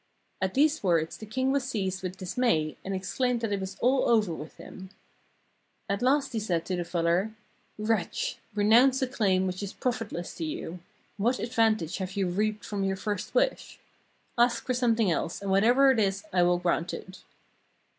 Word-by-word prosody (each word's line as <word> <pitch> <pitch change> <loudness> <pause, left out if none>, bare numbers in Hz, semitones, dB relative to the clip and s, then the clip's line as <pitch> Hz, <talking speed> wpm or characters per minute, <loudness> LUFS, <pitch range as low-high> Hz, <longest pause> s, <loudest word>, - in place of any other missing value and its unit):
At 190 0 -1
these 300 +3 +3
words 165 -4 +1
the 215 - -10
king 260 +5 0
was 280 -1 +1
seized 195 -7 -2
with 185 0 -5
dismay 180 -5 0
and 195 0 -3
exclaimed 240 +6 -1
that 225 -2 -2
it 200 - 0
was 190 0 -6
all 255 +2 +3
over 215 -7 +3
with 155 -1 -9
him. 190 0 -10 1.0
At 200 +2 -1
last 275 +2 +2
he 225 - 0
said 175 -6 -1
to 185 - -2
the 175 - -2
fuller: 175 +5 0 0.4
'Wretch! 215 -2 -1 0.2
renounce 245 +6 +5
a - - +1
claim 195 -7 +1
which 185 +1 -3
is 200 -1 -5
profitless 225 -8 -3
to 170 - -4
you. 160 +2 -5 0.4
What 235 +5 +1
advantage 225 -7 +1
have 185 -1 -3
5" 190 - -11
ARABIA 190 -3 0
you - - -5
reaped 215 +1 -1
from 200 -2 -3
your 195 0 0
first 205 0 -4
wish? - - 0 0.6
Ask 240 0 +3
for 255 - 0
something 230 -5 +2
else, 165 - -2
and 200 -1 -3
whatever 245 +8 +5
it 245 - +1
is, 195 -1 0
I 180 - +4
will 175 0 +4
grant 175 -1 -1
it.' 185 +1 -10
205 Hz, 190 wpm, -28 LUFS, 185-240 Hz, 1.0 s, renounce